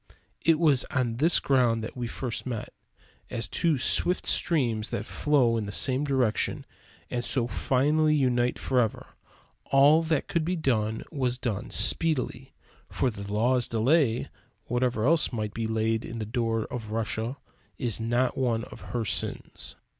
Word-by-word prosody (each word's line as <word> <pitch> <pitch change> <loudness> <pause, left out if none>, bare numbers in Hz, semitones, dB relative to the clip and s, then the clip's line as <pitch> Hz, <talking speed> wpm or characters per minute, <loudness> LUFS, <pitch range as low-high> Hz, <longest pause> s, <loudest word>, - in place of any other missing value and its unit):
It 165 0 +4
was 150 -5 +4
on 120 -4 -1
this 160 +6 +3
ground 120 -4 +2
that 110 - -7
we 120 -2 -4
first 120 +1 -5
met; 115 -4 -5 0.6
as 115 -1 -3
two 165 -4 +1
swift 175 +7 +2
streams 120 -10 +1
that 105 - -4
flow 130 -6 +2
in 105 -2 -3
the - - -5
same 130 +6 +2
direction 130 -6 0 0.5
and 120 -1 -2
so 125 -2 0
finally 150 +7 +1
unite 125 -3 +1
forever. 125 -5 -1 0.6
All 145 +4 +5
that 160 -3 -1
could 170 -2 0
be 180 +3 -1
done 110 -8 -1
was 125 -4 -1
done 115 -6 -3
speedily; 135 -4 +1 0.3
for 130 - 0
"the 100 -1 -8
law's 120 +4 +2
delay," 120 +1 +2 0.4
whatever 120 -2 0
else 165 +3 +3
must 110 -4 -3
be 115 -1 -3
laid 110 0 0
to 115 - -8
the 110 -2 -4
door 115 0 -1
of 115 -3 -6
Russia, 115 +3 -3 0.4
is 120 -6 -2
not 120 +3 0
one 120 -4 0
of - - -11
her 115 -2 -1
sins. 85 -4 -4
125 Hz, 155 wpm, -27 LUFS, 115-140 Hz, 0.6 s, All